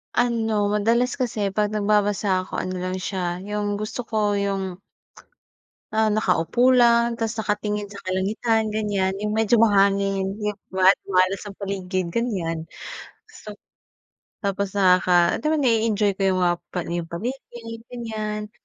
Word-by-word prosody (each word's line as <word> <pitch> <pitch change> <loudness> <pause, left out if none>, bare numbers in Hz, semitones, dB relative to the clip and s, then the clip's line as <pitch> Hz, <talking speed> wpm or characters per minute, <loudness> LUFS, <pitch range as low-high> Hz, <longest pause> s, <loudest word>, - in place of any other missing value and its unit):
Ano, 225 -4 +1
madalas 235 +6 +1
kasi 215 -5 -1
'pag 210 +1 +1
nagbabasa 205 -2 +1
ako, - - -7
ano 185 0 -3
lang 185 +1 -3
siya 180 -1 -3
yung 205 0 -2
gusto 215 +4 -4
ko 210 -2 +1
yung, 195 -2 -2 1.2
ah, 220 0 +3
nakaupo 215 +5 +2
lang, 235 -1 +4
ta's 225 0 -3
nakatingin 210 -1 -1
sa 200 - -10
kalangitan 215 +4 0
ganyan. 200 -3 0
Yung 210 - -1
medyo 225 +1 +3
mahangin, 195 -2 +2
yung 210 -1 -2 0.2
maat 190 +1 +5
maaliwas 185 +2 +1
ang 200 - -9
paligid, 185 -2 -2
ganyan. 170 -8 -2 0.8
So 210 - -7 0.9
tapos 200 -1 -2
nakaka 180 -3 +4
'di - - -11
ba, - - +2
na-e-enjoy 220 -5 +2
ko - - -5
yung 185 - 0
mga 175 -1 +3 0.2
pali-paligid, 225 +7 -5
ganyan. 215 -3 -4
205 Hz, 130 wpm, -23 LUFS, 190-220 Hz, 1.2 s, maat